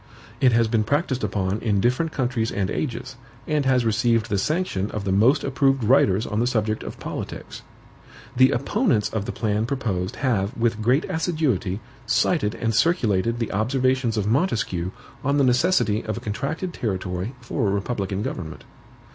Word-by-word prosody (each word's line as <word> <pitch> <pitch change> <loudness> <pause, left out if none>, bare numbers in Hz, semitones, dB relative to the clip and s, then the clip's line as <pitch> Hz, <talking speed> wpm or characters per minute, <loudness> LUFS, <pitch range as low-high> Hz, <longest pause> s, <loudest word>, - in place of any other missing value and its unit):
It 130 - +5
has 115 -1 +3
been 110 -1 +1
practiced 135 0 0
upon 95 0 -1
in 105 -4 +1
different 125 +9 +1
countries 125 -5 -1
and 100 -1 -1
ages, 130 -2 -4 0.3
and 150 -3 0
has 125 -2 +3
received 115 0 +2
the 100 - +2
sanction 130 - -1
of 105 - -4
the 100 - -1
most 115 +10 +4
approved 135 -1 +1
writers 110 -3 +4
on 105 - -2
the 120 - +2
subject 110 -3 0
of - - -8
politics. - - -6 0.7
The 130 +1 +6
opponents 140 - +1
of 110 -2 -3
the - - -3
plan 110 0 -1
proposed 105 -9 -2
have, 110 -6 -1
with 115 -2 0
great 125 +8 +2
assiduity, 155 - -1 0.3
cited 130 -1 +1
and 115 -1 -1
circulated 115 - +2
the 115 -2 -2
observations 125 +2 +1
of 105 - 0
Montesquieu 110 - 0 0.3
on 140 +1 +1
the 140 - +4
necessity 125 - +2
of 110 -2 -3
a - - -3
contracted 160 - -3
territory 95 +1 -3
for 120 -1 -2
a - - +1
republican 100 -1 -2
government. 80 -6 -5
115 Hz, 165 wpm, -23 LUFS, 105-130 Hz, 0.7 s, The